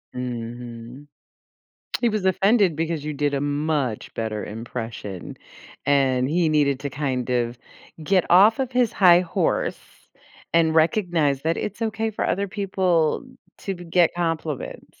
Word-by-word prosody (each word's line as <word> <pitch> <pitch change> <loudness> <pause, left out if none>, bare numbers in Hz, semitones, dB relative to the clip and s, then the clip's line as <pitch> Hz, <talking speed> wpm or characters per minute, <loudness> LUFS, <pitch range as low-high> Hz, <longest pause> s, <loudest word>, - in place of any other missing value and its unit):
Mhm. 120 +2 -7 0.9
He 240 - +3
was 215 -3 -2
offended 195 -2 +3
because 165 -2 -2
you 155 - -3
did 145 0 -1
a 135 - 0
much 145 -5 -1
better 110 -2 -3
impression, 110 -3 -7 0.5
and 135 -2 +2
he 165 +1 +2
needed 145 -3 +2
to 140 -1 -4
kind 130 -3 -2
of 120 -1 -1 0.4
get 185 +2 +2
off 200 +5 +6
of 260 -1 -1
his 245 -3 +2
high 180 -2 +6
horse 175 - -1 0.7
and 165 -1 +3
recognize 160 - +2
that 165 +1 0
it's 210 +2 -4
okay 220 0 -1
for 215 - -2
other 200 +2 0
people 185 - 0 0.3
to 195 - -4
b 175 -1 -10
get 170 0 +2
compliments. 165 -4 -4
155 Hz, 140 wpm, -23 LUFS, 130-185 Hz, 0.9 s, off